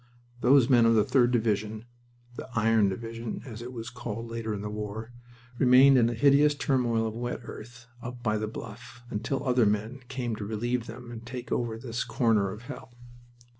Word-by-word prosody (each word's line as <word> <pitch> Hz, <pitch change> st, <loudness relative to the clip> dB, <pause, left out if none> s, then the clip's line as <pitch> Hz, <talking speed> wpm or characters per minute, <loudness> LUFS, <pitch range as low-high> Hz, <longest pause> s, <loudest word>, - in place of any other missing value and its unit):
Those 130 Hz, 0 st, +5 dB
men 120 Hz, -4 st, +5 dB
of 115 Hz, -, +4 dB
the 105 Hz, -, +5 dB
3d 125 Hz, -1 st, +3 dB
Division 110 Hz, -2 st, -1 dB, 0.5 s
the -, -, -8 dB
"Iron 110 Hz, -2 st, +3 dB
Division," 115 Hz, +3 st, -5 dB
as 115 Hz, -3 st, -8 dB
it 120 Hz, +1 st, -7 dB
was 120 Hz, -1 st, -7 dB
called 115 Hz, -1 st, -6 dB
later 115 Hz, -1 st, -3 dB
in 105 Hz, -1 st, -4 dB
the 105 Hz, -, -3 dB
war 105 Hz, +2 st, -6 dB, 0.5 s
remained 130 Hz, +2 st, +7 dB
in 120 Hz, -2 st, +4 dB
a 120 Hz, -, -3 dB
hideous 145 Hz, +4 st, +5 dB
turmoil 125 Hz, -5 st, +1 dB
of 110 Hz, -, -3 dB
wet 120 Hz, +1 st, -4 dB
earth 120 Hz, +2 st, -10 dB, 0.2 s
up 120 Hz, 0 st, -8 dB
by 110 Hz, -2 st, +1 dB
the 110 Hz, -, -2 dB
Bluff 120 Hz, +2 st, -9 dB
until 115 Hz, +6 st, -2 dB
other 125 Hz, -3 st, +4 dB
men 110 Hz, +5 st, -1 dB
came 120 Hz, -3 st, -3 dB
to 105 Hz, -, -5 dB
relieve 115 Hz, +3 st, -2 dB
them 120 Hz, 0 st, -9 dB
and 115 Hz, -1 st, -8 dB
take 125 Hz, 0 st, -7 dB
over 115 Hz, -2 st, -1 dB
this 115 Hz, 0 st, -3 dB
corner 110 Hz, -5 st, +2 dB
of 105 Hz, +5 st, -8 dB
hell. 125 Hz, -1 st, -10 dB
115 Hz, 190 wpm, -28 LUFS, 110-125 Hz, 0.5 s, remained